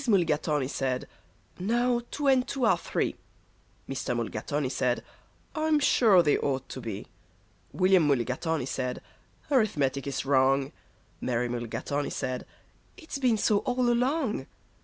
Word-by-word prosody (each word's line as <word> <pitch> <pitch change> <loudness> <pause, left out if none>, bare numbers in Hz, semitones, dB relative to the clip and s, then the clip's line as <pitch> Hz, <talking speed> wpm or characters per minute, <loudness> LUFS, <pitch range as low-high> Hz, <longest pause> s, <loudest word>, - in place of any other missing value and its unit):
Mulligatawny 155 - +2
said, 130 -2 -2 0.5
"Now 240 +5 +1
two 295 - -4
and 260 -2 +4
two 270 -2 -1
are 225 - +5
three." - - -2 0.7
Mr. - - -2
Mulligatawny - - -2
said, - - 0 0.5
"I'm 310 -1 +2
sure 220 -9 +5
they 150 - +3
ought 135 -2 -1
to 130 - -6
be." 110 -4 -5 0.7
William 185 -4 +4
Mulligatawny 140 +3 0
said, 125 -1 -3 0.5
"Arithmetic 145 - +1
is 140 -1 -2
wrong." 135 0 +3 0.5
Mary 125 -1 0
Mulligatawny 120 +4 -3
said, 130 -2 -4 0.5
"It's 315 -6 -7
been 250 -4 +3
so 210 0 +3
all 250 -1 +1
along." 245 - 0
160 Hz, 125 wpm, -28 LUFS, -, 0.7 s, are